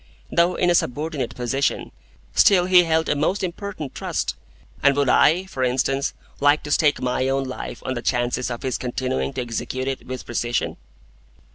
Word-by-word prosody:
Though 170 +1 +3
in 175 -1 +2
a - - +4
subordinate 150 -3 -1
position, 135 +3 -1 0.4
still 185 -3 +5
he 180 -1 +6
held 160 0 +1
a - - +1
most 165 +8 0
important 180 -4 -5
trust, - - -2 0.5
and 140 0 +4
would 140 -2 +2
I 175 +8 +4
(for 135 -9 -4
instance) 135 +2 0 0.2
like 145 +1 +3
to 145 - -6
stake 145 0 +3
my 130 +1 0
own 135 0 +1
life 130 -1 -7
on 130 - -1
the 120 - -4
chances 120 +1 0
of 120 -1 -5
his 130 -2 -2
continuing 130 +2 -2
to 130 - -2
execute 130 +2 -4
it 135 -1 -4
with 130 0 -6
precision? 120 0 -2
135 Hz, 175 wpm, -23 LUFS, 125-160 Hz, 0.5 s, he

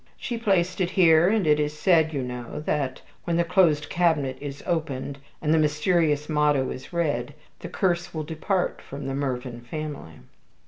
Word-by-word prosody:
"She 240 - -4
placed 190 -5 +1
it 175 - +1
here, 170 -2 +5
and 215 -3 +2
it 150 -1 +4
is 150 0 -1
said, 160 -3 +3
you 140 -4 -2
know, 125 0 -6
that 145 -3 -2 0.2
when 170 -1 0
the 170 - +3
closed 170 -4 +3
cabinet 160 -7 +1
is 140 -1 -7
opened, 140 -4 -2 0.2
and 155 0 +3
the 160 - +4
mysterious 150 0 +2
motto 150 -3 +2
is 130 - -8
read, 145 -6 -1 0.2
the 170 - -7
curse 175 -1 0
will 155 -1 -4
depart 165 +4 -2
from 140 0 -8
the 135 - -3
Mervyn 125 -3 -3
family." 140 - -7
155 Hz, 175 wpm, -25 LUFS, 140-170 Hz, 0.2 s, here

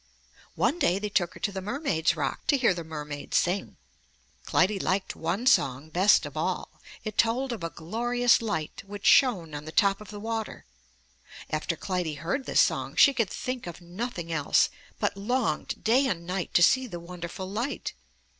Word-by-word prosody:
One 340 - +1
day 180 - +3
they 210 +1 -3
took 175 -4 0
her - - -10
to 205 - 0
the 190 -1 -5
mermaid's 205 - 0
rock - - -3
to 285 - +4
hear 240 -7 +3
the 170 -1 -5
mermaid 150 -2 -6
sing. 185 +2 0 0.7
Clytie 195 +2 +2
liked 190 +1 -1
one 175 +9 -2
song 140 - +2
best 185 -1 +4
of 145 0 -8
all. 175 +4 -3 0.2
It 215 -2 -5
told 245 +4 +2
of 220 -7 -5
a 165 - -2
glorious 240 +10 +1
light 205 -9 -3
which 205 0 -8
shone 185 - +4
on 145 0 -6
the 155 - -7
top 200 +2 +3
of 210 - -11
the 205 - -7
water. 225 0 -4 0.9
After 155 +2 -1
Clytie 180 -4 -2
heard 270 - -3
this - - +4
song, - - 0
she 280 - +7
could 230 -7 0
think 255 -5 -4
of 175 - -7
nothing 175 0 -5
else, 150 -3 +2 0.3
but - - 0
longed 210 -5 -1
day 255 +5 +4
and 170 -7 -2
night 180 0 -3
to 175 - +6
see 260 +8 +4
the 175 -6 -7
wonderful 175 +2 -7
light. 230 +8 -3
195 Hz, 185 wpm, -27 LUFS, 170-230 Hz, 0.9 s, she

